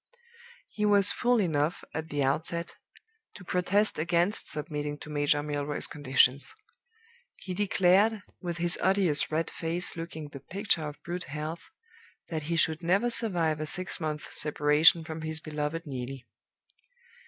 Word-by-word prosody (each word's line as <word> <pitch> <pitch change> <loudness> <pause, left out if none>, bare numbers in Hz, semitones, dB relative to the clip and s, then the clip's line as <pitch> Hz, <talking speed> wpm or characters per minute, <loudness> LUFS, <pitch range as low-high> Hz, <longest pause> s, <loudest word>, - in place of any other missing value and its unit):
"He 210 - -4
was 205 -1 +6
fool 245 -1 +2
enough, 160 -4 0
at 160 0 -4
the 145 -1 -1
outset, 165 +5 -2 0.6
to 195 - -11
protest 180 +2 0
against 170 +5 +1
submitting 150 -1 -4
to 150 - -10
Major 145 0 +1
Milroy's 145 0 -1
conditions. 135 -1 +2 0.8
He 185 - -7
declared, 200 +2 +3 0.2
with 175 -2 -4
his 170 +1 +3
odious 190 -7 +2
red 160 +2 -1
face 170 +2 -1
looking 165 -2 -7
the 140 - -9
picture 180 - -1
of 150 0 -8
brute 180 +1 -4
health, 155 +3 -6 0.6
that 160 -2 -3
he 170 - +1
should 160 -1 +2
never 195 +8 +2
survive 170 -10 +1
a 155 - -3
six 185 +4 0
months' 155 -2 -3
separation 150 +2 +4
from 160 0 -7
his 155 0 -1
beloved 155 +2 -4
Neelie. 130 -2 -6
160 Hz, 140 wpm, -28 LUFS, 150-180 Hz, 0.8 s, was